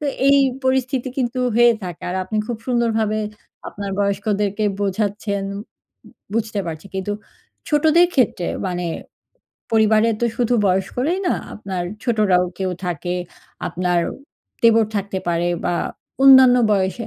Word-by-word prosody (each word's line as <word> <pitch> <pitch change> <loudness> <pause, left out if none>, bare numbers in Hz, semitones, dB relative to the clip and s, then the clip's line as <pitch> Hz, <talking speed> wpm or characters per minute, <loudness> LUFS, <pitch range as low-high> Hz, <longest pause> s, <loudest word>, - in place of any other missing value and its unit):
তো 300 - -5 0.2
এই 280 0 +6 0.3
পরিস্থিতি 260 0 0
কিন্তু 255 0 -1 0.2
হয়ে 240 0 +6
থাকে। 175 -2 -7
আর 185 - -2
আপনি 215 +3 -4
খুব 240 -2 -3
সুন্দরভাবে 225 -3 +1 0.5
আপনার 200 -1 -6
বয়স্কদেরকে 205 +1 0 0.2
বোঝাচ্ছেন 200 0 -1
বু 200 - -5 0.7
বুঝতে 220 -2 -1
পারছি। 160 +3 -6
কিন্তু 190 +2 -2 0.6
ছোটদের 315 +3 +4
ক্ষেত্রে 210 -8 +1 0.2
মানে 180 -1 -3 0.9
পরিবারে 220 0 +4
তো - - +2
শুধু 245 0 +1
বয়স্করাই 220 - 0
না, - - +2 0.2
আপনার 190 -4 -4 0.2
ছোটরাও 210 -6 +2
কেউ 190 -1 -1
থাকে। 175 0 -3 0.6
আপনার 180 -1 0 0.6
দেবর 225 -1 +5
থাকতে 195 -1 -2
পারে। 170 0 +1 0.2
বা - - +1 0.5
অন্যান্য 260 -2 +8 0.2
বয়সে, 195 +3 0
210 Hz, 125 wpm, -20 LUFS, 190-240 Hz, 0.9 s, অন্যান্য